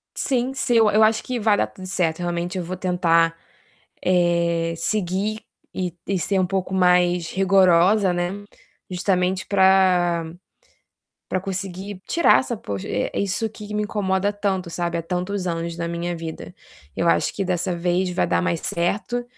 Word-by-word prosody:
Sim, 260 Hz, -1 st, 0 dB
sim. 250 Hz, -2 st, 0 dB
Eu 220 Hz, -2 st, +5 dB
eu 215 Hz, +1 st, +4 dB
acho 220 Hz, 0 st, +3 dB
que 250 Hz, -2 st, -3 dB
vai 210 Hz, -1 st, +3 dB
dar -, -, +1 dB
tudo 185 Hz, -1 st, -11 dB
certo. 180 Hz, -4 st, 0 dB
Realmente, 175 Hz, +1 st, -2 dB
eu 175 Hz, -, -3 dB
vou 185 Hz, +2 st, -5 dB
tentar, 165 Hz, -2 st, +2 dB, 0.7 s
eh, 170 Hz, -2 st, +1 dB
seguir 200 Hz, +4 st, -1 dB, 0.3 s
e 180 Hz, -2 st, -3 dB
e 195 Hz, -2 st, 0 dB
ser 190 Hz, +4 st, 0 dB
um 185 Hz, -, +2 dB
pouco 190 Hz, 0 st, -2 dB
mais 180 Hz, -2 st, +3 dB
rigorosa, 190 Hz, 0 st, +4 dB
né. 175 Hz, +3 st, -3 dB, 0.5 s
Justamente 185 Hz, 0 st, 0 dB
pra 185 Hz, -3 st, +3 dB, 1.0 s
pra 185 Hz, -, -1 dB
conseguir 190 Hz, 0 st, -5 dB
tirar 340 Hz, -, +4 dB
essa 240 Hz, -3 st, -3 dB
poche 100 Hz, -, -6 dB
eh, 105 Hz, -, -1 dB
isso 200 Hz, +3 st, -1 dB
que 210 Hz, -1 st, -9 dB
me 210 Hz, -, 0 dB
incomoda 200 Hz, -1 st, 0 dB
tanto, 190 Hz, -4 st, -2 dB
sabe, 170 Hz, 0 st, -2 dB
há -, -, -3 dB
tantos 180 Hz, +2 st, -3 dB
anos 170 Hz, 0 st, -3 dB
na 170 Hz, 0 st, -2 dB
minha 170 Hz, 0 st, -3 dB
vida. 165 Hz, -1 st, -7 dB, 0.4 s
Eu 170 Hz, -, +1 dB
acho -, -, +2 dB
que 195 Hz, -, -2 dB
dessa 180 Hz, 0 st, -1 dB
vez 180 Hz, +1 st, 0 dB
vai 180 Hz, -, 0 dB
dar -, -, +1 dB
mais 175 Hz, -3 st, -1 dB
certo. 210 Hz, +8 st, -1 dB
185 Hz, 165 wpm, -22 LUFS, 175-200 Hz, 1.0 s, Eu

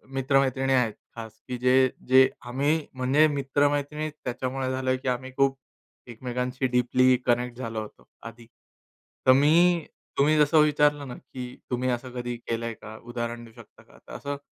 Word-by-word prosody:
मित्र-मैत्रिणी 135 Hz, 0 st, +1 dB
आहेत 125 Hz, -5 st, +2 dB, 0.2 s
खास, 110 Hz, -2 st, -8 dB
की 125 Hz, -1 st, -4 dB
जे-जे 130 Hz, +1 st, +4 dB, 0.2 s
आम्ही 145 Hz, +5 st, 0 dB
म्हणजे 135 Hz, +4 st, +3 dB
मित्र-मैत्रिणी 145 Hz, +1 st, 0 dB
त्याच्यामुळे 130 Hz, +1 st, -3 dB
झालोय, 130 Hz, 0 st, 0 dB
की 130 Hz, +1 st, -8 dB
आम्ही 130 Hz, +1 st, -3 dB
खूप 135 Hz, 0 st, +2 dB, 0.5 s
एकमेकांशी 125 Hz, +2 st, -3 dB
डीपली 125 Hz, +1 st, +3 dB
कनेक्ट 120 Hz, 0 st, 0 dB
झालो 115 Hz, -3 st, -4 dB
होतो 105 Hz, -, -12 dB, 0.2 s
आधी. 115 Hz, 0 st, -10 dB, 0.8 s
तर 130 Hz, -, +9 dB
मी 165 Hz, +5 st, +4 dB, 0.3 s
तुम्ही 150 Hz, +2 st, +4 dB
जसं 150 Hz, +1 st, +4 dB
विचारलं 150 Hz, -1 st, +2 dB
ना, 125 Hz, -, -7 dB
की 125 Hz, -1 st, -9 dB, 0.2 s
तुम्ही 125 Hz, +1 st, 0 dB
असं 125 Hz, +1 st, -3 dB
कधी 120 Hz, 0 st, -4 dB
केलंय 115 Hz, 0 st, -4 dB
का? 110 Hz, 0 st, -11 dB
उदाहरण 120 Hz, 0 st, -5 dB
देऊ 115 Hz, -, -16 dB
शकता -, -, -23 dB
का? -, -, -21 dB
तर -, -, -10 dB
असं 140 Hz, 0 st, -5 dB
130 Hz, 155 wpm, -26 LUFS, 120-140 Hz, 0.8 s, तर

